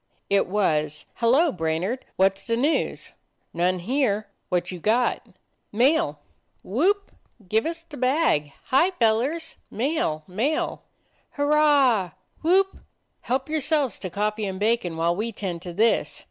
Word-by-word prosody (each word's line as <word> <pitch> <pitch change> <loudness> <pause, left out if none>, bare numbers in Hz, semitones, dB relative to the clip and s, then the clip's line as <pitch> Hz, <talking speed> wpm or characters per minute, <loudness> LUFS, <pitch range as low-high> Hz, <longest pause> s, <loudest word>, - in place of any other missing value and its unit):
It 200 0 +3
was, 155 -6 0
"Hello, 270 +8 +4
Brainard, 175 +9 -2
what 190 +1 +4
' - - -23
s - - -11
the 230 0 +1
news?" 290 +6 0 0.4
"None 180 +2 +1
here. 215 +1 0 0.2
What 180 -1 0
you 180 - -6
got?" 230 +7 +1 0.5
"Mail." 240 - +2 0.5
"Whoop! 380 - +1 0.4
Give 220 - +1
us 330 0 -5
the 310 -3 -11
bag! 255 - +1 0.2
Hi, 300 +8 +5
fellers! 285 +3 0
Mail! 240 - -1
Mail!" 235 +12 -1 0.5
"Hurrah! 285 - +3 0.3
Whoop! 380 +4 +3 0.4
Help 260 +2 -1
yourselves 300 - 0
to 185 - -5
coffee 210 +2 -1
and 190 -1 -5
bacon 210 -6 0
while 170 +1 +1
we 220 +4 -2
tend 185 -5 -5
to 180 - -7
this. 220 +6 +1
230 Hz, 135 wpm, -24 LUFS, 185-290 Hz, 0.5 s, Hi